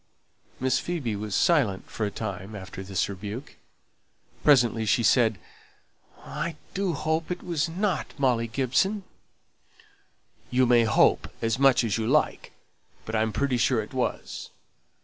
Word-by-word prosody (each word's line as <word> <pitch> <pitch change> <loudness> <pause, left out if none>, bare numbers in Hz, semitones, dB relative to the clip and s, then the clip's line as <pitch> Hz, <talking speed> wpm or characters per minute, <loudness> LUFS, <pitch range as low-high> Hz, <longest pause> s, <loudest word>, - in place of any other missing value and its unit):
Miss 130 0 +2
Phoebe 145 -11 -3
was 105 0 -4
silent 140 - +2
for 105 - -2
a - - -2
time 100 -1 -6
after 95 -1 -8
this 95 -1 -1
rebuke. 105 +7 -7 0.9
Presently 120 -6 +4
she 110 +3 +2
said, 115 -2 +4 0.9
"I 150 +2 -4 0.2
do 190 -2 0
hope 160 +2 -1
it 180 0 -4
wasn't 170 +2 -1
Molly 125 -4 +1
Gibson." 140 - 0 1.5
"You 130 +1 +3
may 120 -1 +5
hope 110 - +3
as 115 +1 -1
much 135 -2 +5
as 115 -1 0
you 110 - -1
like, 150 +5 +1 0.5
but 110 - -6
I'm 110 0 +1
pretty 135 +1 0
sure 120 0 +2
it 110 +3 -6
was. 130 -1 -3
125 Hz, 135 wpm, -26 LUFS, 110-150 Hz, 1.5 s, may